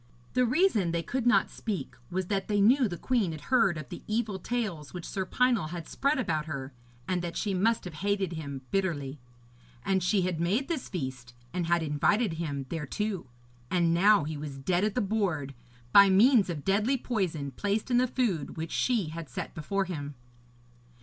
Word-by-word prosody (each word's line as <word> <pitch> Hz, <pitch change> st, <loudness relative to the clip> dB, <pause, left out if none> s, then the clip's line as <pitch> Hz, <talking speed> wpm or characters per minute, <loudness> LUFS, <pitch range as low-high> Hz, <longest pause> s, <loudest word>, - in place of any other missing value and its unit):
The 250 Hz, -1 st, +3 dB
reason 255 Hz, -, +3 dB
they 170 Hz, 0 st, -1 dB
could 245 Hz, +7 st, -2 dB
not 245 Hz, -, +4 dB
speak 195 Hz, -, -4 dB, 0.2 s
was 185 Hz, +1 st, -2 dB
that 195 Hz, +1 st, -1 dB
they 205 Hz, -1 st, +1 dB
knew 245 Hz, +5 st, +5 dB
the 175 Hz, -3 st, -5 dB
queen 220 Hz, -9 st, 0 dB
had 155 Hz, -, -8 dB
heard 195 Hz, -9 st, +4 dB
of 145 Hz, -5 st, -7 dB
the -, -, -7 dB
evil 215 Hz, -3 st, -1 dB
tales 190 Hz, -9 st, -3 dB
which 175 Hz, -, -6 dB
Sir 190 Hz, -1 st, -3 dB
Pinel 245 Hz, -10 st, +2 dB
had 170 Hz, -1 st, -6 dB
spread 280 Hz, +2 st, +1 dB
about 155 Hz, -11 st, -1 dB
her, 140 Hz, -3 st, -5 dB, 0.3 s
and 180 Hz, -1 st, 0 dB
that 170 Hz, -1 st, -4 dB
she 205 Hz, -, -1 dB
must 220 Hz, +5 st, +1 dB
have 180 Hz, -, -6 dB
hated 195 Hz, +2 st, -1 dB
him 140 Hz, -4 st, -6 dB
bitterly. 150 Hz, -8 st, -1 dB, 0.7 s
And 190 Hz, -1 st, +2 dB
she 185 Hz, +2 st, +2 dB
had 180 Hz, -3 st, -1 dB
made 205 Hz, +11 st, +1 dB
this 325 Hz, -7 st, -3 dB
feast, 130 Hz, -8 st, -5 dB, 0.2 s
and 175 Hz, -2 st, -1 dB
had 170 Hz, -1 st, +2 dB
invited 160 Hz, +7 st, +2 dB
him 140 Hz, -4 st, -3 dB
thereto, 170 Hz, +4 st, -3 dB, 0.4 s
and 170 Hz, -2 st, +2 dB
now 200 Hz, 0 st, +5 dB
he 155 Hz, +1 st, -4 dB
was 145 Hz, -2 st, -6 dB
dead 175 Hz, +7 st, 0 dB
at 210 Hz, -1 st, 0 dB
the 250 Hz, -, +2 dB
board, 190 Hz, -10 st, -1 dB, 0.4 s
by 200 Hz, -1 st, +9 dB
means 210 Hz, +2 st, +5 dB
of 155 Hz, -5 st, -4 dB
deadly 210 Hz, +7 st, +2 dB
poison 180 Hz, -, -2 dB
placed 205 Hz, -, -2 dB
in 240 Hz, -, +4 dB
the 255 Hz, -, +3 dB
food 215 Hz, -, -1 dB
which 160 Hz, +1 st, -4 dB
she 225 Hz, -10 st, +1 dB
had 165 Hz, -2 st, -7 dB
set 125 Hz, -, -5 dB
before 195 Hz, +5 st, -1 dB
him. 145 Hz, -5 st, -5 dB
185 Hz, 190 wpm, -29 LUFS, 155-215 Hz, 0.7 s, by